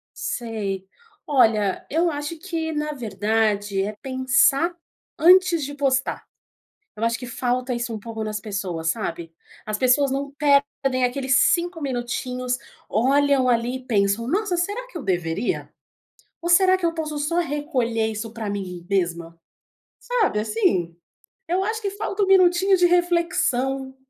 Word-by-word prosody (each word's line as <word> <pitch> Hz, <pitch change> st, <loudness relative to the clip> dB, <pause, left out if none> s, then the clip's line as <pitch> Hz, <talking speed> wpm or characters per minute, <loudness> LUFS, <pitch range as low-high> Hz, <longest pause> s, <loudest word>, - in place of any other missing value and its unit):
Sei. 210 Hz, -5 st, -4 dB, 0.4 s
Olha, 220 Hz, -8 st, +2 dB
eu 335 Hz, +4 st, +2 dB
acho 295 Hz, +2 st, -5 dB
que 325 Hz, -2 st, -3 dB
na 300 Hz, 0 st, -2 dB
verdade, 210 Hz, -3 st, 0 dB
é 210 Hz, +2 st, -4 dB
pensar 275 Hz, +5 st, +2 dB, 0.4 s
antes 360 Hz, -1 st, +5 dB
de 285 Hz, +1 st, -5 dB
postar. 270 Hz, -2 st, 0 dB, 0.7 s
Eu 220 Hz, -, -3 dB
acho 230 Hz, 0 st, 0 dB
que 250 Hz, -, -7 dB
falta 250 Hz, +1 st, -2 dB
isso 240 Hz, -1 st, -3 dB
um -, -, -4 dB
pouco 225 Hz, +1 st, -6 dB
nas 215 Hz, -1 st, -3 dB
pessoas, 190 Hz, -6 st, -3 dB
sabe. 170 Hz, -4 st, -4 dB, 0.3 s
As 215 Hz, -1 st, -3 dB
pessoas 260 Hz, +3 st, +3 dB
não 275 Hz, +1 st, -2 dB
perdem 280 Hz, -3 st, +1 dB
aqueles 260 Hz, +1 st, +1 dB
5 345 Hz, +3 st, +2 dB
minutinhos, 250 Hz, -1 st, -3 dB, 0.3 s
olham 270 Hz, +3 st, +3 dB
ali 240 Hz, +1 st, +1 dB
e 255 Hz, -1 st, -11 dB
pensam: 205 Hz, 0 st, +1 dB
"Nossa, 385 Hz, +3 st, 0 dB
será 410 Hz, +8 st, -2 dB
que 365 Hz, -, -7 dB
eu -, -, -7 dB
deveria? 175 Hz, +2 st, -2 dB, 0.7 s
Ou 345 Hz, -, -3 dB
será 370 Hz, +1 st, +5 dB
que 365 Hz, -, -3 dB
eu 335 Hz, -, +1 dB
posso 310 Hz, -2 st, -4 dB
só 300 Hz, +4 st, 0 dB
recolher 265 Hz, -8 st, -1 dB
isso 220 Hz, +1 st, -5 dB
pra 225 Hz, -3 st, -4 dB
mim 185 Hz, -4 st, -5 dB
mesma?". 170 Hz, -3 st, -2 dB, 0.6 s
Sabe 460 Hz, -, 0 dB
assim? 210 Hz, -6 st, 0 dB, 0.5 s
Eu 365 Hz, +3 st, +1 dB
acho 440 Hz, +2 st, -2 dB
que 400 Hz, -2 st, -2 dB
falta 405 Hz, 0 st, -2 dB
um -, -, 0 dB
minutinho 380 Hz, 0 st, +5 dB
de 355 Hz, -, +4 dB
reflexão. 315 Hz, -7 st, +1 dB
260 Hz, 145 wpm, -23 LUFS, 220-330 Hz, 0.7 s, antes